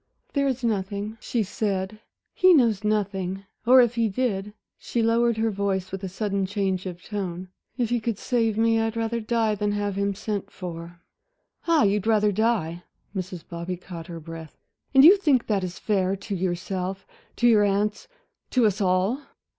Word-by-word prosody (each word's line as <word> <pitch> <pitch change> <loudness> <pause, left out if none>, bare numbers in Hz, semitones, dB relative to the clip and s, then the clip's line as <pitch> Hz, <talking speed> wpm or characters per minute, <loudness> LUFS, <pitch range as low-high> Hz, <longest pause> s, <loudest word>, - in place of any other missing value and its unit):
"There 280 -1 +2
is 260 -2 -2
nothing," 210 0 -2
she 235 -3 -1
said. 200 0 -2 0.3
"He 370 -1 +6
knows 225 -7 +3
nothing; 195 -2 -1 0.2
or 255 +1 +8
if 240 -1 +2
he 230 -2 +1
did" 205 -2 -1 0.3
she 235 - -1
lowered 230 0 +2
her 225 0 +1
voice 195 -2 -2
with 195 0 -5
a 190 - -3
sudden 195 0 -1
change 190 -2 -1
of 180 -1 -8
tone 185 -3 -5 0.3
"if 240 -3 0
he 240 - +2
could 225 -2 -2
save 225 -3 0
me, 225 0 +3
I'd 225 0 -1
rather 230 +1 -1
die 225 -1 +1
than 205 0 -1
have 205 -1 -2
him 200 0 0
sent 205 0 -4
for." 170 -1 -8 0.7
"Ah 330 -7 +4
you'd 205 +1 +1
rather 210 -2 +3
die?" 200 -6 0 0.3
Mrs. 185 -2 -5
Bobby 170 +1 -5
caught 170 -2 -9
her 170 -1 -7
breath. 165 -1 -10 0.3
"And 270 0 +7
you 380 +5 +9
think 290 -11 +2
that 200 -3 0
is 180 -1 -5
fair 195 -2 0
to 200 +2 -6
yourself, 185 +1 -3 0.3
to 240 - +3
your 215 -3 +6
aunts, 205 - 0 0.4
to 250 -3 +3
us 205 0 +1
all?" 190 +8 +1
205 Hz, 180 wpm, -25 LUFS, 190-225 Hz, 0.7 s, you